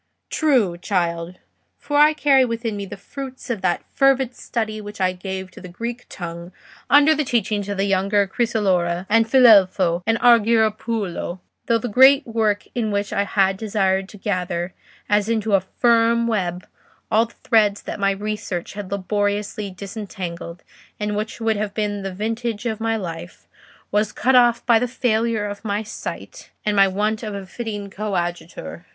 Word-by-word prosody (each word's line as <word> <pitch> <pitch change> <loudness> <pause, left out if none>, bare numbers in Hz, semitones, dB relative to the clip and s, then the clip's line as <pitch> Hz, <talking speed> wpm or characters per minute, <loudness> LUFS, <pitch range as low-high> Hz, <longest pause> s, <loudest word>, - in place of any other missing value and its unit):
"True, 240 - +2
child; 175 -2 -1 0.4
for 290 - -5
I 300 +1 +6
carry 280 -3 +4
within 230 -2 -2
me 200 -1 -5
the - - -8
fruits 260 +4 -8
of 220 -5 -3
that 175 -2 0
fervid 270 -2 +3
study 215 -2 -3
which 205 0 -9
I 185 -1 +2
gave 190 0 -6
to - - -13
the 185 - -9
Greek 235 +7 -6
tongue 170 0 -7 0.4
under 290 +2 +6
the 305 0 0
teaching 215 -5 -1
of 200 - -3
the 195 - +1
younger 200 +1 +2
Crisolora, 190 -5 0
and 225 +1 +4
Filelfo, 195 -8 +5
and 225 0 +3
Argiropulo; 220 -5 +2 0.3
though 230 - +3
that 230 0 -4
great 270 +5 +6
work 220 -3 0
in 230 -3 -1
which 205 0 -2
I 200 - +1
had 195 -1 +2
desired 195 -2 0
to 210 - -12
gather, 180 -3 -2 0.3
as 210 +1 +2
into 220 -2 0
a 195 - +5
firm 230 +3 +2
web, 185 -6 -2 0.5
all 225 +2 +3
the 235 - -22
threads 210 -4 +3
that - - -6
my 195 0 +2
research 195 -3 -4
had 200 -2 -7
laboriously 205 +1 -2
disentangled, 185 -3 -7 0.4
and 210 0 -2
which 215 +3 -4
would 225 -1 0
have 205 0 -3
been 205 -2 -2
the 195 0 -4
vintage 225 +3 -3
of 220 -2 -2
my 225 0 0
life, 175 -3 -7 0.4
was 210 +1 +1
cut 265 - +1
off 240 -2 +4
by 230 -2 +5
the 250 - 0
failure 230 -3 0
of 205 0 -6
my 210 0 -2
sight 220 - -8 0.2
and 210 -1 +1
my 195 -1 +6
want 210 +3 -1
of 215 -3 -5
a 195 -1 -6
fitting 205 -1 -6
coadjutor. 175 - -4
210 Hz, 170 wpm, -21 LUFS, 190-230 Hz, 0.5 s, I